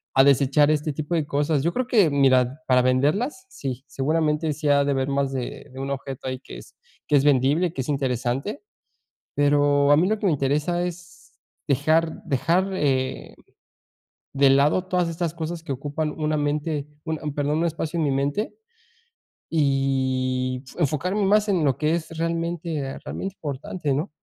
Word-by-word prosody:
a 135 - +6
desechar 140 +2 +4
este 155 0 0
tipo 155 +4 -3
de 160 -3 0
cosas. 145 0 0
Yo 170 - +1
creo 255 -1 -1
que 210 -10 +4
mira, 135 -1 +3
para 125 -1 +5
venderlas. 150 - +1
Sí, 135 - -6
seguramente 150 +3 0
sí 150 +1 -4
ha 140 0 +4
de 140 - +1
haber 135 -1 0
más 140 -1 0
de 130 +2 -5
de 130 - -10
un 135 0 -4
objeto 135 -1 -5
ahí 130 0 -3
que - - -10
es - - -14 0.3
que 150 - +3
es 140 - +4
vendible, 145 +5 +3
y - - -7
que - - -9
es 130 - -6
interesante. 135 - -1 0.7
Pero 145 0 +3
a - - +8
mí 175 +4 +3
lo 215 0 0
que 210 - -3
me 175 - +3
interesa 150 +6 0
es 175 0 -8 0.4
dejar 155 +4 +1
dejar, 170 +8 +1
eh, 130 -5 -1 1.0
de 140 0 +5
lado 145 +7 +3
todas 180 -2 +1
estas 165 -1 -3
cosas 165 0 -5
que 155 - -4
ocupan 145 +3 -3
una 155 -1 0
mente 145 0 -1 0.2
un 160 -1 -2
un 150 -2 -4
perdón, 145 +1 0
un 170 - +2
espacio 165 0 -3
en 160 - +1
mi 145 - +1
mente, 140 +10 -1 1.0
y 130 -3 0
enfocarme 175 +6 0
más 210 +2 +3
en 180 -6 +2
lo 135 -3 +1
que 155 +1 +1
es 165 -2 -3
realmente, 165 -2 -2
ah, 135 - -6
realmente 195 0 -5
importante, 150 +1 -3
¿no? 150 +8 -2
145 Hz, 180 wpm, -24 LUFS, 135-165 Hz, 1.0 s, a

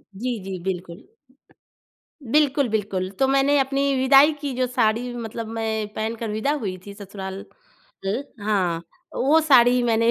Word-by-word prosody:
जी, 240 +4 -3
जी, 190 -1 -5
बिल्कुल। 180 -2 -5 1.2
बिल्कुल 285 -2 +3
बिल्कुल। 195 -4 -2
तो 270 - +4
मैंने 275 +2 +3
अपनी 275 +1 +1
विदाई 270 +3 +6
की 285 -3 -3
जो 255 -1 +1
साड़ी 245 0 0
मतलब 230 -1 -5
मैं 220 -1 -2
पहनकर 225 +1 -3
विदा 220 +7 0
हुई 185 -3 -3
थी 200 - -9
ससुराल, 195 -1 -8 0.6
ल 205 +7 -1 0.2
हाँ 185 -6 0 0.3
वो 300 +5 +3
साड़ी 250 -5 +5
मैंने 230 -1 +2
230 Hz, 145 wpm, -23 LUFS, 200-270 Hz, 1.2 s, विदाई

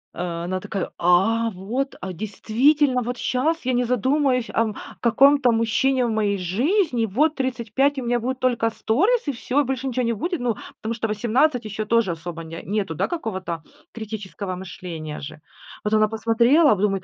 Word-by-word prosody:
Э, 170 -1 -3
она 185 +2 -2
такая: 190 0 -4
"А, 195 +7 +3
вот, 225 +9 -3
а 185 +1 -5
действительно, 250 - +2
вот 245 +1 -4
щас 310 +8 0
я 255 - +1
не 245 0 +2
задумаюсь, 250 +1 +1
ам, 220 -2 +1 0.2
каком-то 270 +2 +5
мужчине 245 +3 +2
в 235 - -1
моей 210 -2 +1
жизни, 245 - +1
вот 290 +10 +2
35, 260 +2 0
у 265 - -2
меня 240 0 +1
будет 255 +3 -2
только 245 -3 +1
сторис 365 - +1
и - - +2
всё, 265 +3 0
больше 265 0 -3
ничё 255 -1 -1
не 230 -1 +1
будет." 340 - -2
Ну, 240 -3 0 0.3
потому 220 +1 -2
что 225 -1 -2
18 240 +4 +1
еще 215 0 -4
тоже 230 -3 +2
особо 165 0 -6
не 165 +1 -8
нету, 200 -3 -2
да, - - 0
какого-то 190 - -4 0.3
критического 205 -3 -6
мышления 170 -4 -7
же. 155 +1 -9 0.4
Вот 210 - -1
она 215 0 +4
посмотрела, 235 +8 +4
а - - +5
потом 195 - -3
думает: 195 -1 -2
230 Hz, 180 wpm, -23 LUFS, 195-260 Hz, 0.4 s, каком-то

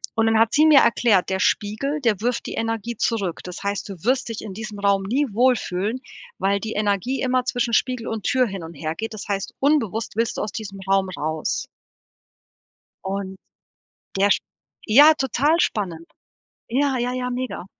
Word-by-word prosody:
Und 225 - +2
dann 225 0 +3
hat 225 0 +4
sie 305 +1 +5
mir 300 -3 +8
erklärt, 220 -6 +3
der 190 - 0
Spiegel, 275 +11 0
der 220 -6 +1
wirft 245 +1 -1
die - - -5
Energie 225 0 -3
zurück. 200 -8 -1
Das 180 +1 -8
heißt, 200 +1 -2
du 195 - -6
wirst 255 0 +1
dich 225 - -5
in 205 -3 -7
diesem 215 -2 -7
Raum 200 -1 +2
nie 265 +8 0
wohlfühlen, 235 -2 +1 0.4
weil 200 +1 +1
die 220 +2 -5
Energie 210 +5 0
immer 255 -1 +1
zwischen 245 -2 -1
Spiegel 250 0 0
und 220 -3 -4
Tür 255 -1 +2
hin 195 -4 -6
und 165 +1 -8
hergeht. 165 +10 -4
Das 215 - -8
heißt, 195 -1 -2
unbewusst 230 -8 +1
willst 230 0 0
du - - -1
aus 210 - -3
diesem 195 -3 -7
Raum 195 -1 +3
raus. 155 -3 -2 1.4
Und 190 0 -4 0.8
der 200 +1 +3
sch - - +4 0.5
ja, 290 +8 +8
total 285 +3 +1
spannend. 170 -6 -2 0.6
Ja, 270 +2 +1
ja, 245 +1 -1
ja, 250 0 -2
mega. 250 -7 -4
220 Hz, 180 wpm, -22 LUFS, 195-250 Hz, 1.4 s, mir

